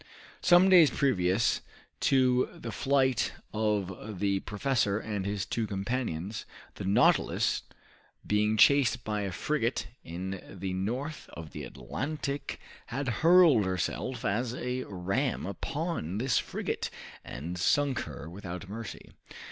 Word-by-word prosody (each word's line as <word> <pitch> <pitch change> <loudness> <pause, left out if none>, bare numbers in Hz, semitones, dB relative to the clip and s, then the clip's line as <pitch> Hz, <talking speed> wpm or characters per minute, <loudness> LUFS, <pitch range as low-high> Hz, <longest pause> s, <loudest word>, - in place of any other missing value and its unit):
Some 175 +1 +6
days 175 -6 +8
previous 105 -6 +2 0.4
to 130 -2 +3
the 115 - -6
flight 130 +3 +2 0.2
of 105 -2 -2
the 100 -1 +1
professor 105 0 0
and 105 -3 -3
his 100 -2 -2
two 115 -2 -2
companions, 100 -2 -3 0.3
the - - -6
"Nautilus," 95 - +3 0.6
being 105 +1 +2
chased 130 -1 +5
by 105 -1 -2
a 100 -1 -2
frigate 115 - -1
in 95 +3 -5
the 95 0 -4
north 125 +11 -3
of 80 -2 -8
the - - -6
Atlantic 140 - -4 0.3
had 135 +2 -2
hurled 165 - +7
herself 95 +7 -2
as 120 +4 0
a 125 0 -3
ram 95 +8 -1
upon 100 - -3
this 125 0 +2
frigate, - - -3 0.3
and 85 +7 -6
sunk 140 +8 +2
her 75 - -6
without 90 +1 -7
mercy. 110 +2 -7
110 Hz, 125 wpm, -30 LUFS, 95-130 Hz, 0.6 s, days